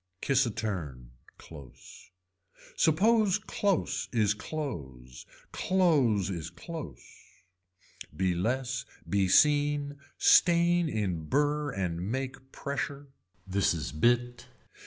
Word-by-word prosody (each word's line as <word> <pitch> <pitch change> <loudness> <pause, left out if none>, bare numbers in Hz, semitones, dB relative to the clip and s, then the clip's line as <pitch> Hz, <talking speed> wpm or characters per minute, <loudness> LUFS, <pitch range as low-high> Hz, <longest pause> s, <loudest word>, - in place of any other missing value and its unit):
Kiss 135 +1 +2
a - - -1
turn, 80 - -5 0.3
close. 70 0 -14 0.7
Suppose 205 +5 +3
close 205 -3 -1
is 110 -3 +2
clothes, 70 - -7 0.2
clothes 140 - +2
is 80 -3 -5
close. 85 - -9 1.1
Be 95 0 +1
less 125 +7 -2 0.2
be 100 -1 +1
seen, 145 +5 +3 0.2
stain 175 -1 +4
in 95 - -2
burr 145 - 0
and 90 -8 -3
make 130 0 -5
pressure. 140 0 -5 0.4
This 95 -2 +1
is 80 - -4
bit. 120 +8 0
120 Hz, 95 wpm, -29 LUFS, 90-150 Hz, 1.1 s, stain